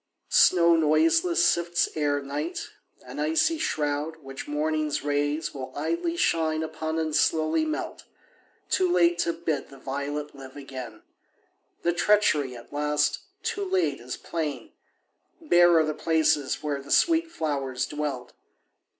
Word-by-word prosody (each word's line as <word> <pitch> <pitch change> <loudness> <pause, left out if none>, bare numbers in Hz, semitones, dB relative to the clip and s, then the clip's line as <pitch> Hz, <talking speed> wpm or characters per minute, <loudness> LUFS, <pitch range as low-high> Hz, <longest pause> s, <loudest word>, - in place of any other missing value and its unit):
Snow 170 -2 +6
noiseless 330 - +3
sifts 170 - +2
Ere 145 -2 0
night, 145 +4 -4 0.4
an 130 +3 -8
icy 160 - +1
shroud, 150 - -1
which 135 0 -8
morning's 150 0 -1
rays 145 +2 -1
Willidly 335 - -3
shine 160 - +1
upon 160 0 -4
and 160 -2 -1
slowly 160 - +2
melt, 310 0 -4 0.6
Too 370 -2 +1
late 175 - +3
to 170 - +1
bid 165 -2 -3
the 135 - -13
violet 145 +2 -4
live 135 -1 -12
again. 130 -5 -8 0.8
The 175 - +2
treachery, 170 -9 +2
at 120 +3 -13
last, 150 0 +1 0.2
too 450 -3 -2
late, 375 -1 0
is - - -6
plain; 150 -7 -4 0.7
Bare 175 - +5
are 160 - +4
the 155 - -1
places 155 -4 +1
where 145 -2 -2
the 140 - -14
sweet 330 - +3
flowers 140 - -2
dwelt. 145 -5 -4
155 Hz, 135 wpm, -26 LUFS, 145-170 Hz, 0.8 s, Snow